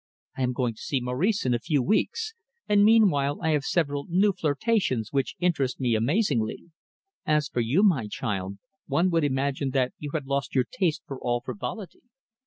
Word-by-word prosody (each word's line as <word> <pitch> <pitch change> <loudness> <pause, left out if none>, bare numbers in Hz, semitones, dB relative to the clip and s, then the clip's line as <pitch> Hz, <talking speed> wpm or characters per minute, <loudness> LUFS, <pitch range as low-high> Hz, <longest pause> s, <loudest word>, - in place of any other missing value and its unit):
I - - -5
am 125 0 +1
going 125 -2 -1
to 110 - -15
see 135 - -1
Maurice 130 - 0
in 125 - +2
a 120 - +1
few 145 0 0
weeks, 440 - 0 0.3
and 205 -1 +4
meanwhile 185 -11 +4
I 160 - -1
have 150 -2 +1
several 145 -3 -1
new 195 +4 +3
flirtations 150 - 0
which 135 -2 0
interest 155 -8 0
me 125 -3 +1
amazingly. 130 - 0 0.5
As 150 -1 +1
for - - -2
you, 135 - +2
my 150 - +3
child, 100 -3 -4 0.3
one 180 +2 +2
would 165 -2 +2
imagine 140 0 0
that 130 -2 +1
you 150 - -5
had 150 -3 -2
lost 140 0 -2
your 130 -2 +3
taste 170 -6 0
for 135 -2 -7
all 120 0 -1
frivolity. 130 - -6
140 Hz, 185 wpm, -26 LUFS, 125-175 Hz, 0.5 s, and